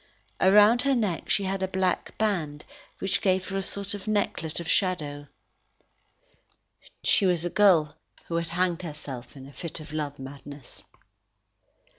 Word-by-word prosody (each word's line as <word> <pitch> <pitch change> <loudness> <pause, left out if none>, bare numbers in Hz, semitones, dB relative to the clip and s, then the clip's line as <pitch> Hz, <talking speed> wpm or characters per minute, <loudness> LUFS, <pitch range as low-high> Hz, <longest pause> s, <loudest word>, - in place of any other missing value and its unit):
Around 210 +5 +6
her 275 0 +2
neck 205 -8 -1
she 200 - +2
had 195 0 -2
a 190 - +1
black 190 -1 -1
band, 165 -9 -1 0.3
which 195 - -1
gave 185 -1 +1
her 195 - -2
a - - 0
sort 200 +1 -1
of 205 0 -7
necklet 200 -7 -1
of 170 - -6
shadow. 150 -7 0 1.8
She 195 - +3
was 175 -2 +1
a 175 - -2
girl 170 -8 +4 0.3
who 165 - -2
had 170 0 -1
hanged 175 0 0
herself 145 -7 -8
in 135 - -10
a 140 - -13
fit 170 +2 -6
of 155 -1 -10
love 145 -2 -3
madness. 140 0 -10
175 Hz, 155 wpm, -27 LUFS, 150-195 Hz, 1.8 s, Around